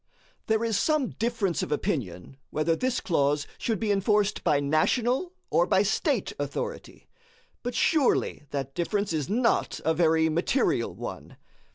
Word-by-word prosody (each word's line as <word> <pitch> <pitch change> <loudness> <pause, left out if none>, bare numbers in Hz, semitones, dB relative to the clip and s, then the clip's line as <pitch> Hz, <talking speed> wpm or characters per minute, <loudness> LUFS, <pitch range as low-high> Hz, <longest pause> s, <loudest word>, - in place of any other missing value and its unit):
There 220 0 +2
is 225 -2 +1
some 305 -5 +1
difference 225 -6 -1
of - - -4
opinion 135 - -3
whether 155 +2 +1
this 255 +5 -1
clause 145 -3 +1
should 225 -4 -1
be 215 -2 0
enforced 205 +1 +1
by 145 - +3
national 240 - +1 0.2
or - - +3
by - - +3
State - - 0
authority; 480 0 -5 0.5
but 245 0 -4
surely 285 - +2
that 135 -1 -4
difference 200 +3 -1
is 155 0 -2
not 230 +3 +1
a 160 - +3
very 160 -1 +3
material 170 - 0
one. - - -8
195 Hz, 145 wpm, -27 LUFS, 155-235 Hz, 0.5 s, by